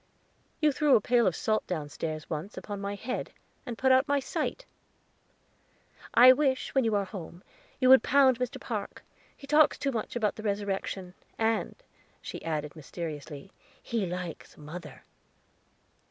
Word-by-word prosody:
"You 305 -1 +4
threw 290 0 +4
a - - +6
pail 240 +1 +3
of 180 - +1
salt 215 +6 0
downstairs, 155 -1 -4
once, 160 +6 -5
upon 205 -1 -6
my 200 0 -3
head, 230 +5 -4 0.4
and 235 -2 -5
put 260 0 +3
out 260 +2 +5
my 285 -1 +2
sight." 275 - -3 1.5
"I 255 +2 +10
wish, 265 -2 0
when 265 - +3
you 225 -2 +1
are 200 -1 +1
home, 180 -2 -9 0.4
you 255 - +3
would 265 -3 +9
pound 265 -2 +4
Mr. 250 +2 -3
Park; 215 -6 -5 0.3
he 275 - -11
talks 300 +1 +4
too 275 - -1
much 230 -1 -4
about 215 -4 0
the - - -6
Resurrection. 200 -3 -3 0.2
And," 225 0 0 0.4
she - - -8
added 155 -1 -3
mysteriously, 155 +1 -7 0.3
"he 225 -5 -2
likes 180 -2 -6
mother." 150 -2 -9
210 Hz, 155 wpm, -29 LUFS, 175-260 Hz, 1.5 s, I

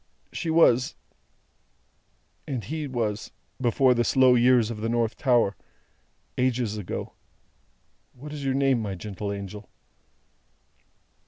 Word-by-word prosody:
She 170 - -3
was 130 -6 +4 1.5
and 130 -6 -3
He 150 +6 -4
was 110 -5 -3 0.3
before 125 +1 +3
the 120 -1 +1
slow 130 +1 +5
years 120 -2 +4
of 105 -2 -6
the 115 - -1
North 115 0 0
Tower 120 -7 +2 0.8
ages 125 -4 0
ago. 105 -4 -5 1.0
What 145 +4 -10
is 145 -2 -6
your 135 -1 0
name, 135 -3 +2
my 100 -3 -4
gentle 100 +1 -5
angel?" 100 +1 -7
120 Hz, 115 wpm, -26 LUFS, 105-130 Hz, 1.5 s, slow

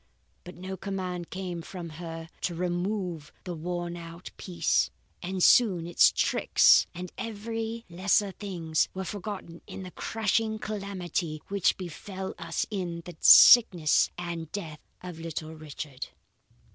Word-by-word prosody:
"But 180 - -10
no 190 +2 -6
command 185 -3 -4
came 180 -2 -5
from 175 0 -8
her 165 -1 -6
to 175 - -2
remove 180 -2 -2
the 180 - -5
worn 175 +1 -4
out 170 +1 -9
piece, 170 -3 0 0.3
and 185 0 -2
soon 190 -9 +5
its 175 - +5
tricks, - - +4
and 180 0 -6
every 225 +1 -4
lesser 190 +3 +1
thing, 180 -5 -7 0.2
were 190 - -3
forgotten 190 -3 -6
in 190 - -7
the 180 - -8
crushing 220 +1 -1
calamity 190 -7 -4
which 200 -2 +2
befell 190 +2 -6
us 165 0 -2
in 175 -4 -4
the 175 - -9
sickness 180 -10 +7
and 170 -2 -5
death 160 -7 -6 0.2
of 180 -3 -8
little 160 -1 -5
Richard. 150 -3 -7
180 Hz, 135 wpm, -28 LUFS, 165-195 Hz, 0.3 s, sickness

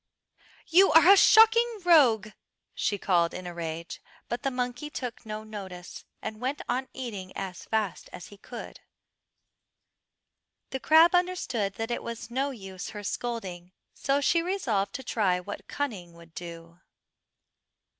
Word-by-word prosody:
"You 370 +3 +5
are 330 +4 +8
a - - +10
shocking 450 +2 +6
rogue," 245 - +5 0.4
she 205 - -1
called 175 -3 +1
in 185 - -7
a 175 - -6
rage; 165 0 -6 0.3
but 240 - -3
the 275 - 0
monkey 250 +2 -3
took 250 -6 -6
no 215 0 -5
notice, 190 -4 -9 0.2
and 215 +1 -6
went 265 +3 -2
on 255 +2 -1
eating 205 -8 -6
as 185 -2 -6
fast 220 -3 -2
as 180 - -10
he 205 - -14
could. - - -9 1.9
The 265 - -3
crab 320 +5 +6
understood 355 - 0
that 225 +1 -4
it 240 - -2
was 235 0 -7
no 270 +3 0
use 195 -8 -8
her 210 -1 -8
scolding, 190 -6 -5 0.2
so 275 +1 0
she 335 +4 +3
resolved 245 - -1
to 265 - -5
try 195 -7 +1
what 205 +3 -8
cunning 205 -12 -4
would 170 -1 -16
do. 170 0 -9
220 Hz, 145 wpm, -28 LUFS, 185-275 Hz, 1.9 s, a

